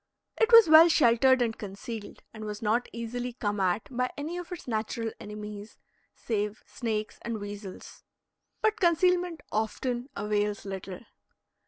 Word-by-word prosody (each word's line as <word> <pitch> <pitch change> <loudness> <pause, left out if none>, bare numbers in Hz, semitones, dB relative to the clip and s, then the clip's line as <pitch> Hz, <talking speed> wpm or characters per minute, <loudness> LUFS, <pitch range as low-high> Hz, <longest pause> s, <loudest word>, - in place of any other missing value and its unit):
It 450 0 +3
was 460 -4 +10
well 320 +2 +9
sheltered 260 -3 +5
and 225 -2 -2
concealed, 210 +2 -8
and 220 -1 -8
was 210 +1 -6
not 225 +3 +1
easily 240 +1 -4
come 205 -3 -2
at 185 +2 0
by 250 +1 +1
any 305 +4 -4
of 355 +1 -7
its 355 - -7
natural 225 0 -2
enemies, 210 0 -8 0.4
save 210 -1 -3
snakes 215 -3 -4
and 230 -2 -4
weasels. 205 -1 -9 0.6
But 435 0 +2
concealment 350 -1 +2
often 240 +4 -2
avails 205 0 -1
little. 190 -1 -6
225 Hz, 140 wpm, -28 LUFS, 210-270 Hz, 0.6 s, was